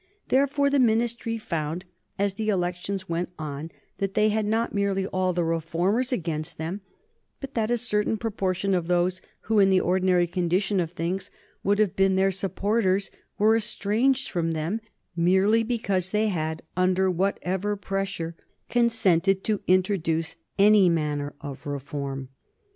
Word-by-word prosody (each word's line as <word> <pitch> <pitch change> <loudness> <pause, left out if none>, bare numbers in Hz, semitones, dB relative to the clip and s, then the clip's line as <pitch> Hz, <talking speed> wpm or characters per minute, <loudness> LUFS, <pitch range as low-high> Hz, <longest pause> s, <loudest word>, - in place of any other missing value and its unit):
Therefore, 280 +1 +2
the 285 - +3
Ministry 230 -1 +1
found, 165 -3 -3 0.3
as 200 0 +1
the 215 +2 -2
elections 185 0 -2
went 170 +1 -2
on, 150 0 -5 0.3
that 195 -1 -2
they 215 0 +4
had 215 0 0
not 225 +2 0
merely 200 -1 0
all 185 -1 0
the 175 -1 0
reformers 170 - 0
against 160 -9 -3
them, 170 +6 -4 0.6
but 275 -1 -7
that 220 -2 0
a 240 - +2
certain 220 -2 +1
proportion 195 -3 -1
of 175 -3 0
those 180 +1 +1 0.2
who, 220 -1 +1
in 195 -1 +6
the 190 -1 +4
ordinary 180 -1 +2
condition 185 +3 0
of 170 -3 0
things, 180 +2 -3 0.3
would 205 +1 +2
have 210 -3 +2
been 195 0 +3
their 190 +1 +3
supporters 195 +1 0 0.3
were 215 +2 +4
estranged 230 +4 +1
from 165 -2 0
them 165 +8 -2 0.3
merely 190 +6 +3
because 200 -6 -1
they 215 +2 +1
had, 160 -3 -2
under 185 +1 +2
whatever 190 +2 -1
pressure, 195 -4 -3 0.4
consented 195 -6 +2
to 215 -2 0
introduce 170 -4 +1 0.2
any 200 -2 +6
manner 150 -3 -1
of 140 -2 -7
reform. 140 -1 -4
190 Hz, 150 wpm, -26 LUFS, 170-210 Hz, 0.6 s, in